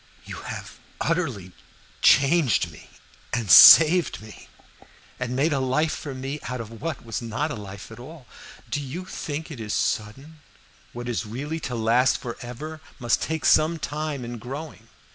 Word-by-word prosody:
You - - -8
have - - -8 0.2
utterly 135 - -2 0.5
changed 140 - +4
me, 75 - -15 0.4
and 115 -6 -1
saved 165 - +9
me, 110 0 -13 0.7
and 125 -1 -3
made 145 +4 +1
a 140 - 0
life 135 +5 0
for 140 -4 -7
me 135 +3 -5
out 125 0 -4
of 115 0 -9
what 155 -7 -5
was 115 0 -4
not 120 +7 -3
life 100 0 -10
at 115 - -11
all. 145 +2 -12 0.4
Do 125 +5 -3
not 170 +7 -7
think 155 +1 -5
it 135 - -8
is 105 -2 -3
sudden 135 +9 -3 0.5
what 120 0 -7
is 120 -2 -3
really 145 +9 -5
to 130 -5 -5
last 115 +3 +2
forever 125 +6 -8 0.2
must 120 -3 0
take 160 -3 -3
some 160 +2 +4
time 150 -3 -4
in 120 0 -7
growing. 135 -1 -8
130 Hz, 160 wpm, -24 LUFS, 115-155 Hz, 0.7 s, saved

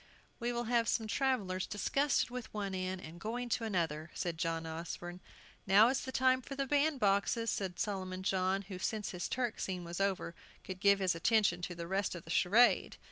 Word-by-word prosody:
"We 240 0 -1
will 240 0 -2
have 235 -1 +1
some 225 - +1
travellers 215 -7 0
disgusted 275 +6 +1
with 250 -2 -6
one 200 -2 -2
inn, 185 0 -2
and 170 0 -10
going 240 +4 -3
to 230 0 0
another," 165 -6 -1
said 170 -2 -3
John 165 -1 -1
Osborne. 170 +2 -6 0.5
"Now 210 +4 +7
is 270 +1 0
the 260 - -5
time 260 0 +3
for 275 +2 -7
the 275 0 -1
bandboxes," 240 -6 +2
said 190 -3 -2
Solomon 185 -2 -3
John, 190 +1 +1
who, 190 -2 -8
since 210 +1 -2
his 180 -1 -4
Turk 245 -2 -1
scene 180 -2 -3
was 170 +2 -4
over, 195 -3 0 0.3
could 185 -1 -7
give 200 0 +5
his 190 -2 +1
attention 180 0 +2
to 175 0 -4
the 170 0 -5
rest 190 +2 -1
of 170 - -8
the 165 - -8
charade. 225 +9 +4
195 Hz, 195 wpm, -34 LUFS, 180-235 Hz, 0.5 s, Now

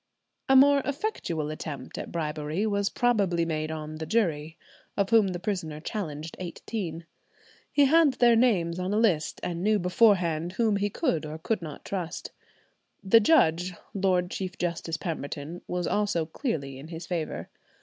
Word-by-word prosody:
A 265 - +6
more 280 +1 +7
effectual 265 - -2
attempt 145 -4 -6
at - - -6
bribery 155 +3 -2
was 200 -1 +1
probably 200 -8 +1
made 155 -1 -2
on 155 0 -5
the 160 0 -5
jury, 165 -8 0 0.4
of 200 +1 +1
whom 225 -3 +6
the 180 -2 -3
prisoner 175 -6 -3
challenged 160 -4 -5
eighteen. 175 -1 -5 0.7
He 285 -1 +5
had 310 0 +5
their 240 -2 +5
names 185 -8 +2
on 185 +3 -1
a - - +2
list, 185 -9 +1
and 170 -1 -3
knew 215 +1 +3
beforehand 180 -3 +2
whom 220 -2 +2
he 205 +1 0
could 195 - 0
or 155 +1 -6
could 185 +5 -2
not 155 -3 -8
trust. 180 -4 -4 0.7
The 205 +4 +6
judge, 180 - +3 0.2
Lord 185 -2 +1
Chief 185 -1 -4
Justice 170 -1 -2
Pemberton, 160 -1 -5
was 180 -1 -2
also 205 -5 0
clearly 155 - -4
in 145 - -9
his 165 +1 -7
favour. 170 -4 -4
180 Hz, 160 wpm, -27 LUFS, 160-210 Hz, 0.7 s, more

